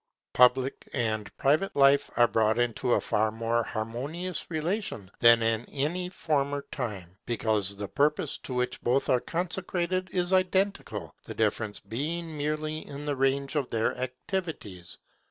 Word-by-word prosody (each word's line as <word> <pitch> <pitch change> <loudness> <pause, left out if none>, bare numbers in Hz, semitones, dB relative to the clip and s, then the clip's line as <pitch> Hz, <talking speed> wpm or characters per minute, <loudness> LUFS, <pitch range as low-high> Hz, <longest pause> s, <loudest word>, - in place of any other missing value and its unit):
Public 125 +2 +3
and 110 -4 -1
private 155 +8 +2
life 140 0 +5
are 120 - +6
brought 110 0 +2
into 120 +1 +1
a - - +3
far 110 +1 +1
more 115 +1 0
harmonious 135 +12 -4
relation 160 - -2
than 115 -1 +7
in 115 0 +1
any 170 +6 -1
former 145 -5 -1
time, 105 -10 -4 0.2
because 110 -4 0
the 100 0 -5
purpose 150 +3 +1
to 130 - -6
which 125 0 -1
both 125 +3 +1
are 125 -1 +4
consecrated 180 +1 -2
is 180 0 0
identical; 190 +2 0
the - - -7
difference 105 -2 0
being 155 +10 -4
merely 155 +1 -2
in 145 +1 -7
the 145 -1 0
range 135 +2 +1
of 140 -4 0
their 115 -1 0
activities. 130 - -5
135 Hz, 145 wpm, -28 LUFS, 115-160 Hz, 0.2 s, than